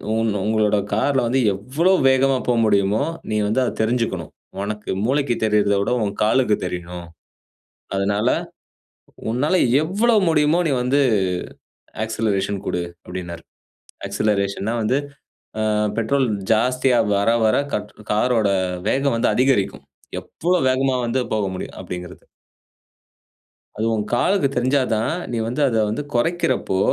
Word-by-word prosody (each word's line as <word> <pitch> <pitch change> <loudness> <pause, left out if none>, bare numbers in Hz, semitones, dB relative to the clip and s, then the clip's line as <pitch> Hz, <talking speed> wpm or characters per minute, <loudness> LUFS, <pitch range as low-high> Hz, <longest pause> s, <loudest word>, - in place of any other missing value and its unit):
உன் 115 -1 +1
உங்களோட 110 -1 +2 0.2
கார்ல 130 +4 +1
வந்து 130 +3 +1
எவ்வளோ 140 - +1 0.2
வேகமா 130 0 +3
போ 125 - +3
முடியுமோ, 100 +3 +2 0.3
நீ - - 0
வந்து 110 +5 +1
அத - - -1
தெரிஞ்சுக்கணும். 110 -7 -1 0.3
உனக்கு 105 +1 -4
மூளைக்கு 135 -1 +1
தெரியரத 105 -1 +2
விட - - -1
உன் 100 -1 -2
காலுக்கு 110 -1 +3
தெரியணும். 90 -1 -6 0.9
அதனால, 100 +2 +1 1.0
உன்னால 130 +9 0 0.3
எவ்வளோ 210 +8 +2
முடியுமோ 155 +1 +3
நீ - - 0
வந்து 135 +3 +2 1.1
ஆக்சிலரேஷன் 100 -3 -1
குடு" 90 - -1 0.2
அப்டின்னார். 85 -2 -7 0.7
ஆக்சிலரேஷன் 100 -2 -1
னா 120 - -1
வந்து 125 +5 +2 0.6
அ - - +1 0.3
பெட்ரோல் 130 +4 +1 0.3
ஜாஸ்தியா 125 +3 +2 0.2
வர, 100 +2 +1 0.2
வர 110 - +3 0.2
கட் 105 0 -4 0.2
கார் 115 +4 +2
ஓட 105 -2 +2 0.4
வேகம் 135 -1 +1
வந்து 115 - +1
அதிகரிக்கும். 125 -7 +1 0.4
எவ்வளோ 180 +2 -1
வேகமா 130 0 +1
வந்து 125 +3 0
போக 105 -2 0
முடியும் 90 - -7
அப்படிங்கிறது. 90 0 -8 1.5
"அது 110 - -2
உன் 105 - -1
காலுக்கு 180 +6 +2
தெரிஞ்சாதான் 130 +1 +2
தான், 115 +8 0 0.2
நீ 120 - -2
வந்து 125 +6 -2
அத 115 - 0
வந்து, 110 +8 -3
குறைக்கறப்போ 130 - 0
115 Hz, 130 wpm, -21 LUFS, 100-130 Hz, 1.5 s, வேகமா